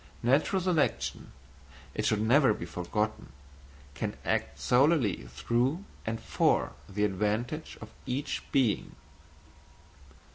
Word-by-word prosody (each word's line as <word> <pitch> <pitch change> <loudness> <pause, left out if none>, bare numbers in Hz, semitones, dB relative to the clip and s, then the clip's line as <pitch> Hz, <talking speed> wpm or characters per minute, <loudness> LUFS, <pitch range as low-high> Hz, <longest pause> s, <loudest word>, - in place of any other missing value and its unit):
Natural 140 +10 +3
selection, 175 -5 0 0.6
it - - 0
should 105 -1 +2
never 125 0 +5
be - - -6
forgotten, 105 - -3 0.6
can - - -4
act 70 +1 0
solely 125 - +3
through 120 - 0 0.2
and 110 0 -1
for 65 - +1 0.2
the 105 +2 +1
advantage 105 - -2
of - - -10
each 130 +3 -2
being. 125 -8 +1
115 Hz, 105 wpm, -30 LUFS, 105-140 Hz, 0.6 s, never